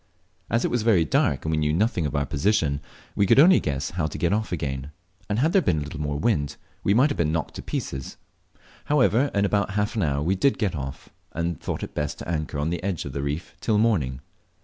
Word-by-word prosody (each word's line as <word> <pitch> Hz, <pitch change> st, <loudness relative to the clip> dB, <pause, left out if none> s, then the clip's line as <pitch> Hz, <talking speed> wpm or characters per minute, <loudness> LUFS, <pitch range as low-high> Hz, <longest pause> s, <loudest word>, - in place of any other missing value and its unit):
As 115 Hz, +2 st, +1 dB
it -, -, 0 dB
was 120 Hz, -, +1 dB
very 105 Hz, -7 st, +4 dB
dark, 70 Hz, -2 st, +1 dB
and 80 Hz, -, 0 dB
we 80 Hz, -, +1 dB
knew 75 Hz, -1 st, +1 dB
nothing 90 Hz, -3 st, +1 dB
of 75 Hz, -, -5 dB
our 70 Hz, 0 st, +1 dB
position, 75 Hz, -3 st, +1 dB, 0.3 s
we 100 Hz, -, +2 dB
could -, -, +5 dB
only 180 Hz, +6 st, +8 dB
guess 70 Hz, 0 st, -2 dB
how 90 Hz, -4 st, -1 dB
to -, -, -6 dB
get 85 Hz, +2 st, +1 dB
off 110 Hz, -1 st, -1 dB
again, 70 Hz, -5 st, -3 dB, 0.4 s
and 105 Hz, -, 0 dB
had 155 Hz, +8 st, +2 dB
there 195 Hz, -, +5 dB
been 90 Hz, -, +1 dB
a 75 Hz, -, -1 dB
little 75 Hz, +1 st, -6 dB
more 75 Hz, -1 st, -2 dB
wind 75 Hz, -6 st, 0 dB, 0.3 s
we 100 Hz, -, +3 dB
might 135 Hz, +5 st, +4 dB
have -, -, -3 dB
been 75 Hz, -2 st, +1 dB
knocked 80 Hz, -1 st, -2 dB
to -, -, -5 dB
pieces. 65 Hz, -1 st, -5 dB, 0.7 s
However, 140 Hz, -2 st, +3 dB
in 100 Hz, 0 st, +3 dB
about 100 Hz, 0 st, 0 dB
half 105 Hz, +2 st, 0 dB
an 110 Hz, -, 0 dB
hour 70 Hz, -4 st, 0 dB
we 90 Hz, +5 st, +2 dB
did 135 Hz, +9 st, +2 dB
get 100 Hz, -7 st, -1 dB
off, 70 Hz, -2 st, -6 dB, 0.2 s
and 85 Hz, +1 st, -1 dB
then -, -, -10 dB
thought -, -, -4 dB
it -, -, -7 dB
best 75 Hz, 0 st, -2 dB
to -, -, -8 dB
anchor 75 Hz, -3 st, -2 dB
on 75 Hz, +3 st, -1 dB
the 85 Hz, -, -2 dB
edge 95 Hz, -4 st, -2 dB
of 70 Hz, -, -6 dB
the 70 Hz, -, -2 dB
reef 70 Hz, +4 st, -4 dB
till 110 Hz, -2 st, +2 dB
morning. 85 Hz, -, +1 dB
85 Hz, 250 wpm, -25 LUFS, 75-105 Hz, 0.7 s, only